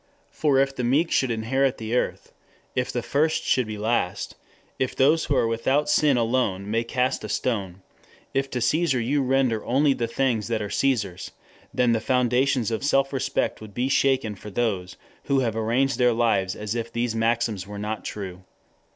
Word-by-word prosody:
For 145 -3 +1
if 135 0 +2
the 125 - -3
meek 145 +8 +2
should 130 - +2
indeed 110 -1 -2
inherit 135 +2 +1
the 110 +2 -3
earth, - - -2 0.4
if 125 0 -1
the 120 - -3
first 155 +5 +1
should 125 -3 +1
be 110 -1 -5
last, 110 +3 -1 0.5
if 130 - -1
those 155 +5 +3
who 145 - 0
are - - +3
without 130 +6 +1
sin 145 -4 +4
alone 115 -5 0
may 115 +1 +1
cast 125 +2 -1
a - - -5
stone, 95 -7 -2 0.5
if 135 0 0
to 125 -2 -3
Caesar 145 +2 +2
you 135 +5 +1
render 130 -4 +1
only 140 +3 +3
the 120 -3 -2
things 115 -3 0
that 115 -2 -1
are 105 -2 -4
Caesar's, 105 -10 0 0.4
then 125 -1 +2
the 115 -1 +1
foundations 125 0 +1
of 110 - -2
self 135 -1 +2
respect 130 - -1
would 105 -2 -11
be 125 +2 0
shaken 135 -5 +2
for 105 +1 -10
those 100 -4 -2 0.3
who 135 -1 +2
have 115 -3 -1
arranged 120 +4 +1
their 125 -1 +4
lives 105 -5 +1
as 105 0 -4
if 115 -1 -4
these 120 -1 -1
maxims 115 -3 0
were 105 0 -7
not 105 +1 -4
true. 95 -3 -6
120 Hz, 190 wpm, -24 LUFS, 110-135 Hz, 0.5 s, sin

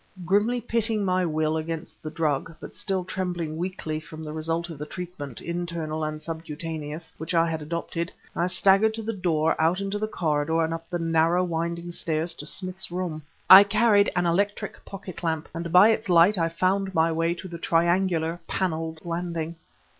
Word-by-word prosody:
Grimly 210 +7 +2
pitting 225 -3 0
my 185 0 +2
will 155 0 0
against 160 0 -5
the 155 - -5
drug, 155 0 -1
but - - -10
still 190 -3 -1
trembling 180 -4 -3
weakly 165 -3 -3
from 155 0 -10
the 150 -1 -6
result 165 +2 -2
of 155 - -9
the 150 - -4
treatment, 170 -9 -7
internal 170 -2 -3
and 155 0 -3
subcutaneous, 160 -1 -6
which 160 +2 -3
I 165 0 +4
had 160 -1 -3
adopted, 170 +2 -3 0.2
I 175 -1 +1
staggered 195 +4 +4
to 225 - -5
the 225 +1 -2
door 165 -5 +1
out 165 +4 +3
into 200 +1 -2
the 215 - -1
corridor 160 -3 0
and 160 0 -1
up 165 0 -7
the 175 - -1
narrow, 165 +1 +2
winding 170 0 -3
stairs 165 0 0
to 150 - -7
Smith's 185 +2 -2
room. 175 -3 -3 0.3
I 190 +2 +12
carried 205 0 +4
an 180 -1 +1
electric 200 +5 -1
pocket 190 -2 -8
lamp, 160 -2 -1
and 170 0 -4
by 185 +5 +8
its 220 -2 0
light 175 +4 +6
I 165 -3 +1
found 190 +3 0
my 165 +1 +3
way 165 +1 0
to 185 - -8
the 170 -2 -8
triangular, 170 0 +1
paneled 160 -3 -2
landing. 170 -1 -3
170 Hz, 185 wpm, -26 LUFS, 160-185 Hz, 0.3 s, I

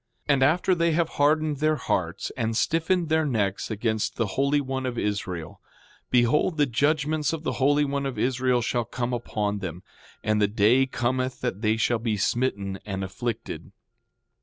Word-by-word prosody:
6:10 145 - +5
And 135 - +1
after 175 +7 +3
they 170 -1 +2
have 165 0 +1
hardened 150 +1 +2
their 155 +2 +2
hearts 140 - -2
and 115 -1 -1
stiffened 165 +2 +1
their 160 0 +3
necks 105 -9 -1
against 110 0 -1
the 115 - 0
Holy 140 +2 +2
One 130 -1 -3
of 120 -1 -4
Israel, 95 -7 -3 0.5
behold 125 +7 +3
the 145 - +4
judgments 150 +4 +1
of 160 -1 -4
the - - -1
Holy 145 +2 +4
One 140 0 -1
of 135 - -5
Israel 125 -1 +1
shall 120 +1 0
come 120 +2 -3
upon 105 -4 -2
them. 90 -2 -6 0.4
And 110 0 +1
the 105 - +4
day 110 +6 +3
cometh 130 +1 -1
that 120 -5 -2
they 110 0 +2
shall 115 +1 +1
be 110 -2 -1
smitten 100 -3 -1
and 95 -2 -4
afflicted. 110 +5 -5
125 Hz, 175 wpm, -26 LUFS, 110-145 Hz, 0.5 s, 6:10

